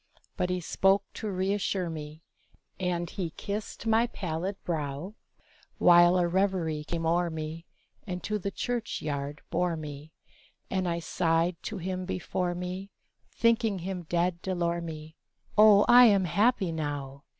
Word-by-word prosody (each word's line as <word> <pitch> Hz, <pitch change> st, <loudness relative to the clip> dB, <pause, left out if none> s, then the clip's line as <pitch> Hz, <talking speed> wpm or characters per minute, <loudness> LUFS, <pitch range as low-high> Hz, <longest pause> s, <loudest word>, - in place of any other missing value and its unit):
But 180 Hz, -, -1 dB
he 180 Hz, 0 st, 0 dB
spoke 195 Hz, +3 st, +2 dB
to 215 Hz, -, -4 dB
reasure 190 Hz, -1 st, -1 dB
me, 155 Hz, 0 st, -7 dB, 0.6 s
And 175 Hz, -2 st, -1 dB
he 180 Hz, -3 st, -4 dB
kissed 210 Hz, +2 st, -5 dB
my 225 Hz, +1 st, +3 dB
pallid 185 Hz, -2 st, -3 dB
brow, 155 Hz, +2 st, -3 dB, 0.6 s
While 175 Hz, +1 st, +6 dB
a 175 Hz, -1 st, +2 dB
reverie 175 Hz, -4 st, 0 dB
came 165 Hz, +1 st, -3 dB
o'er 170 Hz, +1 st, +2 dB
me, 160 Hz, +1 st, -6 dB, 0.4 s
And 180 Hz, -1 st, -4 dB
to 210 Hz, 0 st, -1 dB
the 200 Hz, -, -2 dB
church 240 Hz, +2 st, -3 dB
yard 145 Hz, -1 st, -4 dB
bore 175 Hz, -1 st, 0 dB
me, 150 Hz, 0 st, -8 dB, 0.6 s
And 185 Hz, -1 st, 0 dB
I 170 Hz, -, -1 dB
sighed 165 Hz, +1 st, +1 dB
to 215 Hz, -, -4 dB
him 185 Hz, +1 st, -3 dB
before 180 Hz, -1 st, -2 dB
me, 180 Hz, +2 st, -5 dB, 0.4 s
Thinking 230 Hz, -3 st, +2 dB
him 180 Hz, -1 st, -5 dB
dead 175 Hz, 0 st, 0 dB
D'Elormie, 170 Hz, -4 st, -3 dB, 0.4 s
"Oh, 210 Hz, -1 st, +7 dB
I 245 Hz, +1 st, +9 dB
am 200 Hz, -4 st, +5 dB
happy 200 Hz, +2 st, +2 dB
now!" 145 Hz, -3 st, -4 dB
180 Hz, 140 wpm, -28 LUFS, 165-195 Hz, 0.6 s, I